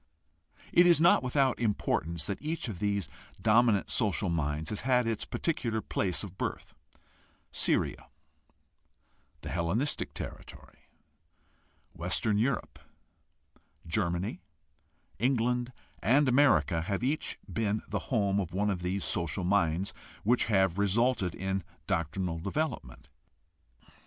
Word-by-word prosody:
It 175 +1 +7
is 170 -3 +6
not 170 +2 +6
without 130 0 +1
importance 85 -7 -1
that 100 - -4
each 155 -2 -3
of 100 -6 -6
these 100 -4 0 0.3
dominant 110 -2 +3
social 100 -4 +1
minds 80 0 -1
has 105 - -2
had 125 -1 +2
its 115 -1 -2
particular 115 -9 -1
place 95 -3 -1
of 95 -2 -9
birth. - - -4 0.8
Syria, - - 0 1.3
the - - -6
Hellenistic 90 - -1
territory. - - -9 1.1
Western 100 +5 0
Europe, 125 +3 -1 1.1
Germany, 85 +2 -1 0.8
England, 125 0 +1 0.3
and 135 +5 +4
America 100 - +4
have 100 +5 -2
each 145 +5 0
been 110 -1 -1
the - - -2
home 100 -5 +2
of 90 -4 -3
one 105 +2 +1
of 90 -2 -3
these 90 +2 -2
social 85 +1 -2
minds 90 -1 +1 0.3
which 120 +4 +3
have 95 -3 +2
resulted 100 -1 +1
in 95 0 -2 0.2
doctrinal 85 +1 -1
development. 100 - -3
100 Hz, 115 wpm, -30 LUFS, 90-120 Hz, 1.3 s, It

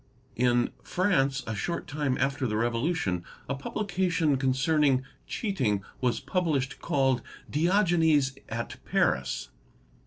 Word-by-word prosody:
In 120 0 +2
France, 140 -8 +1
a 110 - -3
short 170 - -3
time 145 -3 -1
after 135 0 0
the 105 -1 -1
Revolution, 115 - 0 0.2
a - - -1
publication 180 0 0
concerning 135 +1 +2 0.2
cheating 130 - -1 0.2
was 125 -2 +1
published 155 -7 -1
called 135 -3 +2 0.2
"' - - -26
Diogenes 160 -5 +3
at 115 +1 -4
Paris". 65 -2 0
135 Hz, 115 wpm, -28 LUFS, 125-165 Hz, 0.2 s, Diogenes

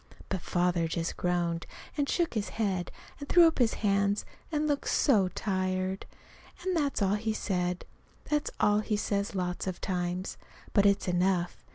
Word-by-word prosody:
But 190 -3 -2
Father 175 -1 +1
just 165 +1 -2
groaned, 175 -1 -1 0.3
and 285 -2 0
shook 345 -2 +1
his 215 -3 -1
head, 190 -5 -1 0.3
and 285 - -7
threw 350 -1 +8
up 325 -3 +3
his 235 -3 +3
hands, 200 0 +2 0.3
and 305 -1 +1
looked 285 -2 0
so 210 -9 +4
tired. 185 0 -2 0.6
And 370 -1 0
that's 285 -9 +1
all 195 0 +3
he 220 +1 0
said. 180 -4 -1 0.4
That's 300 -1 0
all 210 0 +4
he 215 0 -1
says 200 -1 -1
lots 180 0 -2
of 185 - -3
times. 180 0 -2 0.4
But 200 0 +5
it's 200 -1 +2
enough. 180 0 +1
195 Hz, 165 wpm, -30 LUFS, 180-220 Hz, 0.6 s, threw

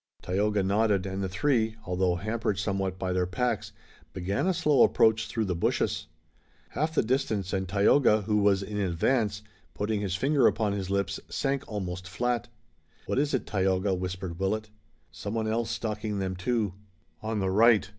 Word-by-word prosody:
Tayoga 100 +2 +1
nodded, 100 -1 +2
and 95 0 -3
the 95 - -2
three, 110 0 +1
although 90 0 +1
hampered 105 +1 -2
somewhat 95 -1 -1
by 95 -1 -2
their 90 -1 +1
packs, 120 +7 -1 0.4
began 95 - -1
a 190 - +3
slow 150 -6 +3
approach 110 0 +4
through 115 -2 -1
the 95 - -1
bushes. 85 - 0 0.6
Half 160 +2 -2
the - - +3
distance, 110 -6 -1
and 95 -1 -1
Tayoga, 105 +2 +4
who 105 +1 +1
was 100 -1 +3
in 105 +1 -4
advance, 105 +3 0 0.3
putting 105 0 -1
his 95 -3 -1
finger 135 +6 +3
upon 105 -2 +1
his 95 -2 -3
lips, 100 -1 -1
sank 135 0 -1
almost 90 -3 -4
flat. 120 +4 -1 0.6
"What - - 0
is 145 -1 +1
it, 130 - -2
Tayoga?" 95 0 +1
whispered 90 -1 -4
Willet. 105 +2 -1 0.4
"Someone 110 +1 -3
else 115 +1 0
stalking 110 -2 -3
them 95 -1 -2
too. 105 +1 -1 0.5
On 110 0 -2
the 95 -2 0
right. 110 0 +5
105 Hz, 165 wpm, -28 LUFS, 95-115 Hz, 0.6 s, right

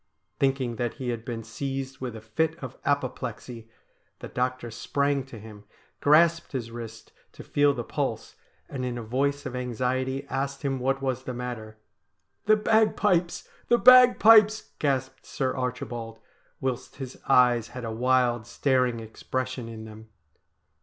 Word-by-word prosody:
Thinking 135 -4 0
that 120 0 -2
he 130 -3 -4
had 115 -2 -3
been 115 -2 -5
seized 135 +3 -5
with 125 -3 -5
a 110 - -8
fit 155 +9 -1
of 130 -1 -8
apoplexy 125 -4 -3 0.5
the - - -8
doctor 125 -1 -2
sprang 140 +4 0
to 125 - -10
him, 105 -1 -12 0.4
grasped 165 +3 +4
his 120 -3 -4
wrist 115 -1 -9 0.2
to - - -11
feel 145 0 +3
the 120 - -3
pulse, - - -3 0.3
and 130 -2 -5
in 125 -1 -3
a 120 - -5
voice 140 +5 -1
of 130 -2 -5
anxiety 130 +2 -2
asked 140 +1 -3
him 135 -2 -1
what 135 +2 -1
was 130 -1 -2
the 125 - -4
matter. 120 -3 -6 0.3
' - - -49
The 215 0 +6
bagpipes! 210 -5 +2 0.2
the 240 - +4
bagpipes! 225 -4 +7
' - - -43
gasped 130 -3 -2
Sir 130 -1 -2
Archibald, 120 -3 -4 0.4
whilst 130 -2 -3
his 130 -2 -8
eyes 120 -3 +4
had 125 -2 -7
a 115 - -3
wild, 120 -1 +1
staring 125 -2 +1
expression 130 +2 -4
in 110 -1 -8
them. 110 0 -12
130 Hz, 155 wpm, -26 LUFS, 120-140 Hz, 0.5 s, bagpipes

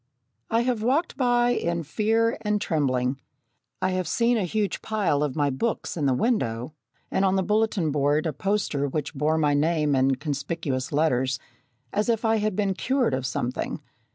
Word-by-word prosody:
I 230 +1 +2
have 240 -2 0
walked 275 +9 +1
by 245 -2 +3
in 170 -7 -1
fear 225 +7 +1
and 210 -1 0
trembling. 135 -6 0 0.6
I 185 - +2
have 185 -1 -1
seen 235 +1 +2
a 210 -5 +1
huge 205 +3 -1
pile 200 -10 0
of 150 -2 -1
my 145 -2 +1
books 220 - -2
in 150 -5 0
the 130 - +2
window, 125 - 0 0.4
and 190 - +1
on 190 -1 +3
the 190 - +2
bulletin 210 -6 +1
board 145 +2 +1
a 160 - -1
poster 190 -5 -1
which 150 +2 -3
bore 150 +2 +1
my 150 -2 +2
name 150 -1 +2
in 135 0 +3
conspicuous 140 -1 -3
letters, 130 -4 +1 0.6
as 210 +3 0
if 230 0 +1
I 225 0 +3
had 210 -2 -1
been 200 -1 +1
cured 255 - 0
of 130 -1 -1
something. 125 +1 -3
170 Hz, 180 wpm, -25 LUFS, 145-215 Hz, 0.6 s, by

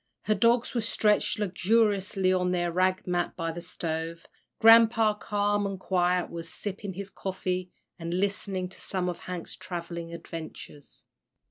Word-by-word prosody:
Her 215 - +2
dogs 235 +2 +3
were 240 - +1
stretched 210 -1 +2
luxuriously 200 -1 +2
on 180 -1 +1
their 175 -1 0
rag 185 +2 +1
mat 175 -1 -1
by 165 -2 -2
the 170 +1 -6
stove, 165 0 -4 0.3
Grampa, 225 -1 +7
calm 205 0 +1
and 195 -1 -5
quiet, 180 -1 +1
was 165 -1 -6
sipping 200 -1 -5
his 200 +2 -7
coffee, 185 -1 -3 0.3
and 165 0 -4
listening 190 0 -1
to 190 - -11
some 185 -2 -1
of 175 - -5
Hank's 180 -2 -6
travelling 170 -2 -6
adventures. 160 -3 -9
185 Hz, 145 wpm, -28 LUFS, 175-205 Hz, 0.3 s, Grampa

